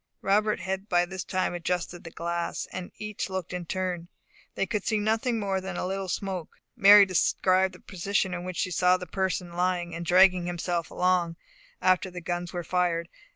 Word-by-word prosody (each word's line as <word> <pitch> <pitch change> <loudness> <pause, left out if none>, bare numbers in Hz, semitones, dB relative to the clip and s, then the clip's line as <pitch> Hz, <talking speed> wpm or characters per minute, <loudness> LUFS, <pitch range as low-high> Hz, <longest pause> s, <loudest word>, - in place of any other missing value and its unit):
Robert 210 0 +2
had 190 +2 -4
by 175 0 +3
this 190 +1 -5
time 185 -1 -1
adjusted 175 0 -3
the 165 - -8
glass, 170 +1 -3
and 185 -1 -6
each 210 -1 -4
looked 190 -2 -4
in 180 -2 -5
turn. 180 -2 -2 0.5
They - - 0
could 210 -2 -2
see 220 - +1
nothing 225 +3 0
more 195 -2 -1
than 190 -1 -5
a - - -2
little 190 0 -3
smoke. 185 -2 -4 0.2
Mary 200 +1 +9
described 185 0 +2
the - - -14
position 190 0 -1
in 175 0 -4
which 185 -1 -5
she 185 - -1
saw 180 +1 +4
the 180 - -7
person 185 -2 -2
lying, 175 -1 0
and 170 +1 -4
dragging 180 0 +5
himself 175 -1 -2
along, 180 -2 +1 0.5
after 185 0 +3
the 180 0 -7
guns 175 0 -3
were 175 -1 -4
fired. 170 -1 0
185 Hz, 190 wpm, -27 LUFS, 175-190 Hz, 0.5 s, Mary